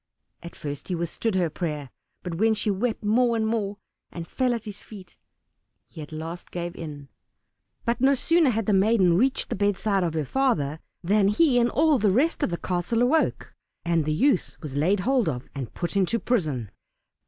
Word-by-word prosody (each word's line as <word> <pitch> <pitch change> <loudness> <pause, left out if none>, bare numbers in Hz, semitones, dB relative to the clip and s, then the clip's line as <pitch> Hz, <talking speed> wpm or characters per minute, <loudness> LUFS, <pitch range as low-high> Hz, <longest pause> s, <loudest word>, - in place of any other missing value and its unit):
At 170 - -10
first 145 -1 -6
he 180 - -2
withstood 170 +5 -2
her 175 -4 +1
prayer, 150 -6 -4 0.3
but 180 - -4
when 220 +1 +3
she 210 0 0
wept 220 +4 -2
more 235 +3 +3
and 220 -1 0
more, 210 -3 -1 0.3
and 170 -1 -7
fell 250 -2 0
at 230 - -6
his 210 -3 -8
feet, 200 -4 -12 0.7
he 160 - -11
at 150 - -9
last 160 +3 -7
gave 175 0 -5
in. 145 -4 -8 0.8
But 235 +1 0
no 275 +1 +5
sooner 330 +3 +3
had 225 -3 -1
the 210 - +1
maiden 195 -3 +4
reached 260 +8 +1
the - - 0
bedside 205 0 +1
of 165 -2 -2
her 155 -2 -1
father 160 - 0 0.2
than 200 +3 +3
he 245 +4 +3
and 240 0 +3
all 305 0 +3
the 210 -1 +3
rest 275 - +1
in - - +1
the 170 - -2
castle 185 +8 -1
awoke, 310 +6 +1 0.3
and 170 -2 +2
the 155 - -1
youth 195 - +1
was 145 -4 -7
laid 180 +7 +2
hold 250 -4 +2
of 125 -3 -5
and 130 -5 -6
put 175 +3 -3
into 195 +4 +2
prison. 155 - -1
195 Hz, 195 wpm, -25 LUFS, 165-235 Hz, 0.8 s, no